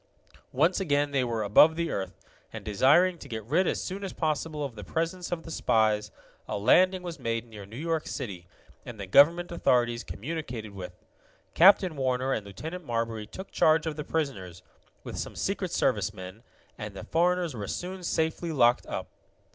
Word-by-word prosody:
Once 165 Hz, +9 st, +2 dB
again 145 Hz, -5 st, +1 dB
they 135 Hz, -2 st, +1 dB
were 115 Hz, -3 st, -1 dB
above 150 Hz, +10 st, +6 dB
the 170 Hz, 0 st, -2 dB
earth, 95 Hz, -1 st, -4 dB, 0.4 s
and, -, -, -8 dB
desiring 150 Hz, -, +4 dB
to 140 Hz, -, -10 dB
get 110 Hz, -2 st, -5 dB
rid 160 Hz, -, +1 dB
as -, -, 0 dB
soon 195 Hz, +2 st, -5 dB
as 195 Hz, -, -5 dB
possible 155 Hz, -1 st, -2 dB
of 135 Hz, -, -6 dB
the 105 Hz, -2 st, -9 dB
presence 165 Hz, -, -3 dB
of 170 Hz, -2 st, -3 dB
the 165 Hz, -, -9 dB
spies, 110 Hz, -6 st, +1 dB, 0.4 s
a -, -, -2 dB
landing 180 Hz, -, +4 dB
was 170 Hz, -3 st, -6 dB
made 115 Hz, -2 st, -2 dB
near 105 Hz, -4 st, -11 dB
New 110 Hz, +3 st, -10 dB
York 160 Hz, +1 st, -2 dB
City, 95 Hz, -10 st, -6 dB, 0.4 s
and 115 Hz, -3 st, -9 dB
the 100 Hz, -, -4 dB
government 165 Hz, -, +5 dB
authorities 120 Hz, -7 st, +1 dB
communicated 120 Hz, -5 st, -6 dB
with. 90 Hz, -2 st, -10 dB, 0.5 s
Captain 185 Hz, -1 st, +6 dB
Warner 130 Hz, -1 st, 0 dB
and 105 Hz, -2 st, -3 dB
Lieutenant 160 Hz, -, -7 dB
Marbury 115 Hz, -4 st, -3 dB
took 190 Hz, -, -9 dB
charge 160 Hz, 0 st, +3 dB
of 160 Hz, -2 st, -2 dB
the 150 Hz, -, -4 dB
prisoners, 100 Hz, -, -3 dB, 0.4 s
with -, -, -6 dB
some -, -, -5 dB
Secret -, -, -2 dB
Service 105 Hz, -, 0 dB
men, 95 Hz, +3 st, -9 dB, 0.4 s
and 105 Hz, -3 st, -6 dB
the -, -, -7 dB
foreigners 175 Hz, -1 st, +1 dB
were 105 Hz, -4 st, -5 dB
soon 185 Hz, -, -5 dB
safely 160 Hz, 0 st, -1 dB
locked 120 Hz, -5 st, +3 dB
up. -, -, -4 dB
140 Hz, 180 wpm, -28 LUFS, 110-165 Hz, 0.5 s, above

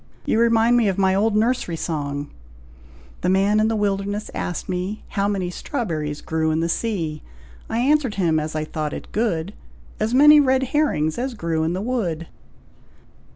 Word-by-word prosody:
You 220 Hz, -, +1 dB
remind 230 Hz, +1 st, +4 dB
me 230 Hz, -3 st, +3 dB
of 190 Hz, -, 0 dB
my 190 Hz, -1 st, +3 dB
old 210 Hz, +2 st, +2 dB
nursery 230 Hz, -5 st, +1 dB
song 145 Hz, -3 st, -3 dB, 0.9 s
'The 180 Hz, -, +1 dB
man 195 Hz, +3 st, +3 dB
in 215 Hz, -, +3 dB
the 225 Hz, -, 0 dB
wilderness 205 Hz, 0 st, -1 dB
asked 175 Hz, -, -4 dB
me, 185 Hz, +3 st, -3 dB
How 200 Hz, 0 st, 0 dB
many 190 Hz, -3 st, -1 dB
strawberries 160 Hz, -, -3 dB
grew 160 Hz, 0 st, -1 dB
in 155 Hz, 0 st, +1 dB
the 165 Hz, -, 0 dB
sea; 165 Hz, -7 st, -2 dB, 0.5 s
I 225 Hz, -, -2 dB
answered 265 Hz, -1 st, +2 dB
him, 165 Hz, -5 st, +2 dB
as 155 Hz, 0 st, -4 dB
I 155 Hz, 0 st, -1 dB
thought 155 Hz, -1 st, -4 dB
it -, -, -8 dB
good, 200 Hz, -5 st, -1 dB, 0.5 s
As 220 Hz, +3 st, 0 dB
many 300 Hz, +2 st, +8 dB
red 265 Hz, -2 st, +3 dB
herrings 160 Hz, -, +1 dB
as 255 Hz, 0 st, -3 dB
grew 165 Hz, -5 st, -1 dB
in 160 Hz, +2 st, 0 dB
the 185 Hz, -, -2 dB
wood.'" 190 Hz, -10 st, -2 dB
195 Hz, 175 wpm, -22 LUFS, 160-230 Hz, 0.9 s, many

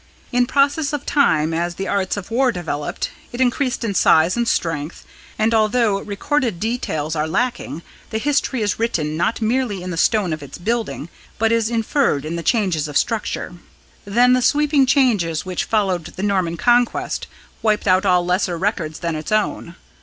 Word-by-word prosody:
In 245 Hz, -1 st, +2 dB
process 285 Hz, +2 st, +1 dB
of 290 Hz, -1 st, -3 dB
time, 160 Hz, -, +2 dB
as 170 Hz, +1 st, -1 dB
the 195 Hz, +2 st, -4 dB
arts 195 Hz, 0 st, -1 dB
of 200 Hz, +2 st, -7 dB
war 255 Hz, +2 st, +3 dB
developed, 165 Hz, -7 st, -4 dB, 0.2 s
it 240 Hz, -, -7 dB
increased 255 Hz, 0 st, 0 dB
in 215 Hz, -3 st, -1 dB
size 165 Hz, -1 st, +4 dB
and 235 Hz, 0 st, 0 dB
strength, 160 Hz, -6 st, -2 dB, 0.3 s
and 220 Hz, +1 st, +2 dB
although 220 Hz, -2 st, +2 dB
recorded 235 Hz, -, -1 dB
details 165 Hz, -9 st, -2 dB
are 155 Hz, 0 st, 0 dB
lacking, 170 Hz, -, -2 dB, 0.3 s
the 220 Hz, -, -2 dB
history 265 Hz, -1 st, 0 dB
is 205 Hz, -, -1 dB
written 155 Hz, -10 st, -1 dB
not 200 Hz, +7 st, 0 dB
merely 225 Hz, -5 st, 0 dB
in 180 Hz, -, -5 dB
the 165 Hz, -, -4 dB
stone 195 Hz, -2 st, +2 dB
of 155 Hz, -, -5 dB
its 140 Hz, -2 st, -9 dB
building, 220 Hz, -5 st, -2 dB, 0.3 s
but 225 Hz, 0 st, +2 dB
is 230 Hz, -1 st, +2 dB
inferred 225 Hz, -, 0 dB
in 160 Hz, +2 st, -3 dB
the 170 Hz, -, -3 dB
changes 180 Hz, -7 st, +1 dB
of 150 Hz, -, -1 dB
structure. 225 Hz, -5 st, -2 dB, 0.5 s
Then 240 Hz, +5 st, +3 dB
the 255 Hz, -, +3 dB
sweeping 290 Hz, +1 st, +3 dB
changes 210 Hz, -, +2 dB
which 185 Hz, -1 st, -2 dB
followed 190 Hz, -6 st, 0 dB
the 185 Hz, -, -7 dB
Norman 185 Hz, -5 st, 0 dB
Conquest 240 Hz, +2 st, +1 dB, 0.3 s
wiped 215 Hz, -2 st, +1 dB
out 185 Hz, +1 st, +4 dB
all 180 Hz, -2 st, +3 dB
lesser 180 Hz, -1 st, 0 dB
records 170 Hz, -5 st, -2 dB
than 170 Hz, -2 st, -2 dB
its 155 Hz, +4 st, -6 dB
own. 210 Hz, -5 st, -1 dB
205 Hz, 175 wpm, -20 LUFS, 170-240 Hz, 0.5 s, size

